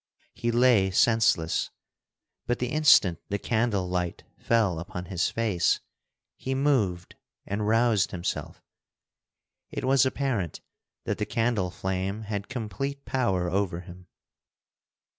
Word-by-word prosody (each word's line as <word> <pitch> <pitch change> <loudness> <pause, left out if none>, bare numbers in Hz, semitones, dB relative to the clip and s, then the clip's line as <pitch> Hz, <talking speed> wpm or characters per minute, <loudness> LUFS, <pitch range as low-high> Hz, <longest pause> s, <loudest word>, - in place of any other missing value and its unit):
He 120 - -2
lay 120 -5 +4
senseless, 95 -5 +2 0.8
but 120 0 +1
the 125 - -2
instant 135 - +5
the 100 - 0
candle 110 -4 0
light 90 -1 -2 0.2
fell 105 -8 +1
upon 90 +1 -6
his 90 -2 0
face, 105 -7 +1 0.6
he 130 0 -3
moved 115 -11 +1 0.3
and 105 +1 -2
roused 115 -2 +3
himself. 90 -1 -4 1.1
It - - -4
was 135 0 +4
apparent 130 - -1 0.4
that - - -3
the - - -1
candle 115 -5 0
flame 95 +3 -3
had 100 -1 -4
complete 135 +3 -4
power 95 -9 0
over 95 -3 -1
him. 90 0 -13
105 Hz, 120 wpm, -27 LUFS, 90-120 Hz, 1.1 s, instant